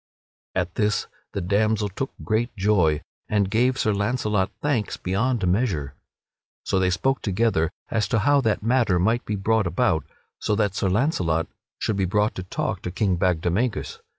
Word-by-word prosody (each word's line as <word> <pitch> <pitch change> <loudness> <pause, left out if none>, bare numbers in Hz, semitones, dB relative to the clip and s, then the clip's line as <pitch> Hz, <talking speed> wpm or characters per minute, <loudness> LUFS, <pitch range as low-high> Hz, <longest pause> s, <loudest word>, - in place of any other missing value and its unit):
At 90 -2 -1
this 105 +1 +1 0.3
the 100 - -2
damsel 105 +3 +1
took 115 +7 -4
great 115 +3 0
joy 90 -7 +2 0.3
and 100 -2 +1
gave 125 +4 +2
Sir 110 - +1
Launcelot 105 -2 0
thanks 135 -8 -1
beyond 105 +4 0
measure. 90 - 0 0.7
So 95 - +1
they 95 -1 +2
spoke 135 +10 0
together 95 -5 +1 0.2
as 110 - +1
to - - +1
how 145 +5 +4
that 110 -4 0
matter 115 -5 +3
might 110 +7 +1
be 105 - -2
brought 105 0 +1
about 85 - +1 0.4
so 105 - 0
that 105 -3 +1
Sir 100 -1 0
Launcelot 90 - +1 0.3
should 110 - -1
be 95 - +1
brought 105 +3 +1
to - - -5
talk 90 - -3
to - - -4
King 95 +1 +1
Bagdemagus. 90 +6 0
105 Hz, 165 wpm, -24 LUFS, 90-115 Hz, 0.7 s, how